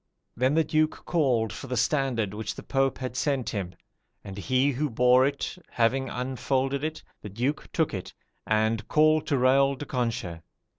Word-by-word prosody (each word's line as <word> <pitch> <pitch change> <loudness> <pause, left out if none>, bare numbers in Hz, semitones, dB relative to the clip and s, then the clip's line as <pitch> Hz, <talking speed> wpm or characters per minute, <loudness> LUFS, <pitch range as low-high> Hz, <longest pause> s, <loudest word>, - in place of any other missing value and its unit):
"Then 130 +4 +2
the 160 - +4
Duke 155 +1 0
called 125 -10 +1
for - - -8
the 125 -1 -2
standard 130 -6 0
which 110 +1 -4
the - - -9
Pope 135 -1 0
had 130 -1 -5
sent 135 -2 0
him, 95 -5 -4 0.5
and 95 - -8
he 130 +7 +1
who 145 +3 -1
bore 125 +2 +4
it 140 +5 -4
having 130 +3 +1
unfolded 130 +2 -1
it, 155 0 -4 0.2
the 105 - -7
Duke 125 +9 -2
took 160 -6 0
it, 95 -3 -6 0.3
and, 110 0 +1
called 155 0 +3
to 145 - +1
Raol 135 +1 +3
de 145 - -6
Conches. 115 -10 -2
130 Hz, 175 wpm, -27 LUFS, 115-140 Hz, 0.5 s, the